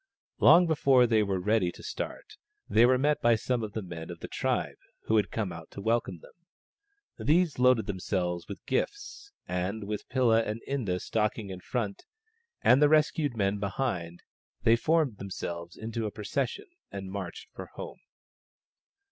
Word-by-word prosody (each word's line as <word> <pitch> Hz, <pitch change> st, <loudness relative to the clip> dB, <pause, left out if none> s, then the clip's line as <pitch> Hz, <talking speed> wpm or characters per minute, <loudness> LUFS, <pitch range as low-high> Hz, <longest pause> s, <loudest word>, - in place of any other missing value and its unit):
Long 175 Hz, +1 st, +7 dB
before 140 Hz, -6 st, +4 dB
they 110 Hz, -2 st, +3 dB
were 100 Hz, -2 st, 0 dB
ready 100 Hz, -1 st, +1 dB
to -, -, -13 dB
start -, -, -6 dB, 0.3 s
they 115 Hz, +2 st, +5 dB
were 130 Hz, 0 st, +4 dB
met 150 Hz, +3 st, +1 dB
by 120 Hz, -1 st, +5 dB
some 120 Hz, +2 st, -1 dB
of 105 Hz, -2 st, -5 dB
the 110 Hz, -, -3 dB
men 85 Hz, -2 st, -8 dB
of 85 Hz, -1 st, -8 dB
the -, -, -6 dB
tribe -, -, -2 dB, 0.2 s
who 110 Hz, -, +1 dB
had 105 Hz, -3 st, +2 dB
come 105 Hz, -5 st, -2 dB
out 85 Hz, -1 st, -9 dB
to -, -, -10 dB
welcome 105 Hz, -5 st, -1 dB
them. -, -, -16 dB, 0.9 s
These 165 Hz, -2 st, +3 dB
loaded 125 Hz, -3 st, +4 dB
themselves 90 Hz, -3 st, -2 dB
with 100 Hz, -, -6 dB
the -, -, -43 dB
gifts, 410 Hz, -, -3 dB, 0.2 s
and 90 Hz, +4 st, -2 dB
with 105 Hz, +1 st, -5 dB
Pilla 120 Hz, -4 st, +3 dB
and 110 Hz, 0 st, -3 dB
Inda 110 Hz, -10 st, -1 dB
stalking 105 Hz, -1 st, -1 dB
in 90 Hz, -, -7 dB
front, 105 Hz, 0 st, -4 dB, 0.6 s
and 130 Hz, +3 st, +6 dB
the 150 Hz, -, +6 dB
rescued 150 Hz, -4 st, +2 dB
men 100 Hz, 0 st, +1 dB
behind, 95 Hz, -5 st, -3 dB, 0.4 s
they 115 Hz, -, +6 dB
formed 150 Hz, -4 st, +1 dB
themselves 85 Hz, -3 st, -6 dB
into 110 Hz, 0 st, -3 dB
a -, -, -5 dB
procession 120 Hz, +5 st, -3 dB, 0.3 s
and 95 Hz, -1 st, -6 dB
marched 95 Hz, -3 st, -6 dB
for -, -, -8 dB
home. -, -, -9 dB
110 Hz, 170 wpm, -29 LUFS, 95-130 Hz, 0.9 s, Long